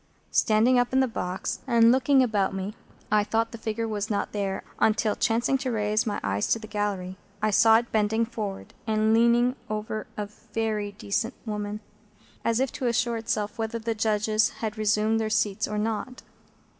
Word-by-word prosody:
Standing 230 +3 +4
up 245 +1 0
in 265 - +4
the 265 - +3
box 185 -5 -3
and 230 -2 +6
looking 265 +1 +4
about 205 -5 0
me, 195 +2 -4 0.4
I 210 -1 +4
thought 225 +2 0
the 230 - -8
figure 225 +1 -2
was 210 -1 -3
not 205 - -1
there, 195 -2 -2 0.2
until, 220 -1 +2
chancing 235 +3 +1
to 260 -1 -2
raise 215 -1 0
my 205 - -1
eyes 100 0 0
to - - +2
the 220 - -9
gallery, 200 -4 -3 0.2
I 215 +1 +1
saw 220 +2 +6
it 235 +1 -3
bending 220 +1 +2
forward, 210 -4 -6
and 220 0 +2
leaning 235 +2 +4
over 215 0 -3
a 210 - -2
very 210 -1 -3
decent 215 +4 -2
woman, 210 -1 -4 0.6
as 230 0 +1
if 265 -1 0
to 255 - -3
assure 235 0 +1
itself 220 -1 -2
whether 225 +1 -2
the 230 0 -2
Judges 215 0 +2
had 220 -2 -5
resumed 215 +1 +2
their 220 -1 -1
seats 215 -1 0
or 210 - -3
not. 225 +4 -3
220 Hz, 180 wpm, -26 LUFS, 210-230 Hz, 0.6 s, and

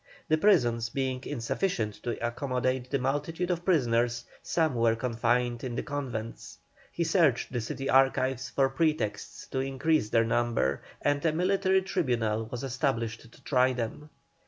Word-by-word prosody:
The 155 - +4
prisons 120 - +3
being 130 0 -2
insufficient 115 - -1
to 120 - -3
accommodate 130 0 -1
the 140 - +1
multitude 145 +7 -1
of 175 -1 -2
prisoners, 120 -8 +1 0.2
some 160 -4 +1
were 115 -1 +2
confined 120 0 0
in 125 -2 -4
the - - -2
convents. 125 -6 -5 0.3
He 170 - -1
searched 160 - +2
the 120 - -1
city 135 +4 -4
archives 130 -1 +2
for 135 -1 +2
pretexts 155 -5 -1
to 130 - -2
increase 135 -1 +1
their 115 +1 +3
number, 115 - 0 0.2
and 145 0 +1
a 165 - +3
military 190 +3 +2
tribunal 120 - 0
was 125 +3 -6
established 120 -4 -2
to - - -20
try 130 -1 +3
them. 125 +5 -5
130 Hz, 150 wpm, -29 LUFS, 120-150 Hz, 0.3 s, The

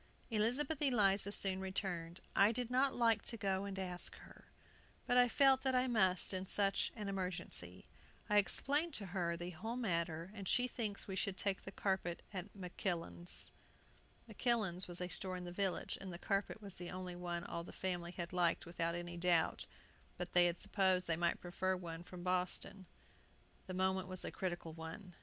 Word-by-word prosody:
Elizabeth 255 +8 +1
Eliza 205 -7 +4
soon 190 -2 +2
returned. 185 -3 -3
"I 200 +2 +6
did 245 +1 -2
not 265 +2 +3
like 230 -3 +4
to 230 - 0
go 195 -1 0
and 195 -1 -5
ask 180 -2 -1
her. - - -15 0.6
But 245 - +5
I 245 - +7
felt 270 +1 +5
that 265 -1 +1
I 250 0 +4
must 190 -7 +3
in 190 0 -2
such 195 0 +2
an 210 -3 -4
emergency. 180 - -2 0.4
I 210 - +3
explained 290 +9 +2
to 205 - -4
her 170 -3 0
the 175 +1 -5
whole 220 +8 -4
matter, 170 -6 -1
and 200 -3 -6
she 250 +6 +3
thinks 215 -5 -3
we 190 - -3
should 195 0 -1
take 195 -1 0
the 195 - -6
carpet 190 -3 -1
at 190 +1 -5
Makillan's." 175 -2 -2 0.8
"Makillan's" 215 -5 +1
was 175 0 0
a 180 - -1
store 185 0 -4
in 180 - -6
the 175 - -6
village, 190 0 -1
and 190 -1 -5
the 170 - -6
carpet 200 +3 -1
was 200 -2 -7
the 175 -1 -6
only 185 -1 -5
one 175 -1 -3
all 170 - -4
the - - -9
family 175 -2 -2
had 170 -1 -5
liked 175 -2 +2
without 170 0 -1
any 175 0 -4
doubt; 170 -1 +2 0.5
but - - -5
they 175 0 +7
had 175 0 -1
supposed 190 -2 +2
they 165 - +1
might 170 +1 +1
prefer 185 +1 -1
one 170 -2 -6
from 180 0 -9
Boston. 185 +1 -1 0.8
The 185 - -4
moment 190 0 +1
was 185 -1 -1
a - - -3
critical 175 -3 -3
one. 165 +4 -8
190 Hz, 185 wpm, -38 LUFS, 175-205 Hz, 0.8 s, I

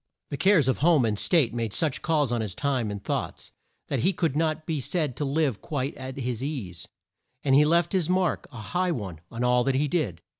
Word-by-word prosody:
The 140 - -2
cares 185 -7 +4
of 130 - +1
home 155 -4 +4
and 105 -2 -1
state 155 -11 +3
made 115 -3 -2
such 140 -5 -1
calls 150 -6 +1
on 120 -2 0
his 100 -4 -4
time 130 -6 0
and 100 -1 -6
thoughts, - - -4 0.4
that - - -1
he 190 +3 +2
could 165 -7 -1
not 155 0 0
be 155 -4 -2
said 150 -2 -1
to 145 - -1
live 140 -5 0
quite 140 -2 -3
at 130 0 -7
his 125 -2 -3
ease, 110 - -5 0.6
and 135 - +2
he 145 +2 +6
left 170 +4 +2
his 180 -4 +1
mark 185 -1 +1
a 125 - -10 0.2
high 180 0 +1
one 95 - -5
on 115 +1 -4
all 125 0 +3
that 135 0 +1
he 145 +3 +2
did. 130 - -1
140 Hz, 225 wpm, -26 LUFS, 120-160 Hz, 0.6 s, he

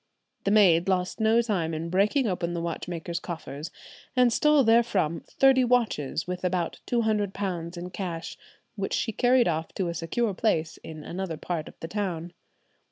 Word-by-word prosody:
The - - +2
maid 195 -4 +5
lost 185 +2 0
no 225 +2 +4
time 175 -8 -1
in 165 +2 -4
breaking 210 +8 +2
open 175 -4 -1
the 170 - -2
watchmaker's 170 0 -4
coffers, 160 -3 -6 0.5
and 250 -2 +4
stole 300 +1 +4
therefrom 220 -9 +2
thirty 265 -1 +4
watches, 230 - +1
with 180 0 -5
about 180 -1 -1
two 240 -1 +2
hundred 210 -3 0
pounds 175 -3 -3
in 180 +1 -6
cash, 175 -3 -5 0.4
which 195 -2 -3
she 225 - 0
carried 245 +2 +3
off 160 -1 -2
to 185 -3 -1
a - - -2
secure 195 +7 -1
place 165 -6 0
in 155 -1 -9
another 175 -1 -4
part 165 -2 -4
of - - -13
the 165 - -4
town. 175 -3 -3
180 Hz, 170 wpm, -27 LUFS, 170-220 Hz, 0.5 s, maid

